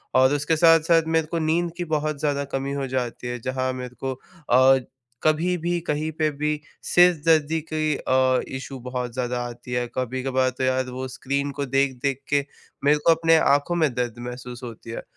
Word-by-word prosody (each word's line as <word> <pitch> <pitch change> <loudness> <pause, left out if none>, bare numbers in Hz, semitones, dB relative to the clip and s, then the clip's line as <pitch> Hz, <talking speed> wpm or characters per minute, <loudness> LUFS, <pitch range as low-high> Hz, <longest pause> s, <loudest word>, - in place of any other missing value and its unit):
और 130 +2 +5
उसके 150 +2 +1
साथ-साथ 165 0 +5
मेरे 160 -1 +2
को 170 - 0
नींद 165 +2 0
की 175 - -2
बहुत 150 -1 -2
ज़्यादा 145 -1 0
कमी 135 +1 -2
हो 140 -1 -2
जाती 125 -1 -3
है, 120 0 -4
जहाँ 130 +2 -2
मेरे 125 -1 -7
को 135 0 -3
अ, 135 -3 +3 0.5
कभी 165 +4 +2
भी 175 +1 -1
कहीं 155 +1 -1
पे 155 -1 +3
भी 150 +1 -2 0.2
सिर 180 0 +5
दर्द 160 -3 +4 0.3
के 155 -1 +1
अ, 130 0 +2 0.2
इशू 130 0 -8
बहुत 125 -1 -4
ज़्यादा 125 0 -2
आती 120 +1 -10
है, 120 0 0
कभी-कभार 130 +1 0
तो - - -2
यार 130 0 +1
वो 130 +1 -5
स्क्रीन 140 +2 -2
को 140 0 -3
देख-देख 135 0 0
के 140 -1 +2 0.4
मेरे 150 +1 +5
को 170 - +7
अपने 165 0 +4
आँखों 145 +3 +2
में 155 -6 +2
दर्द 120 -1 -2
महसूस 125 0 -8
होती 115 -1 -9
है। - - -6
135 Hz, 190 wpm, -24 LUFS, 130-155 Hz, 0.5 s, को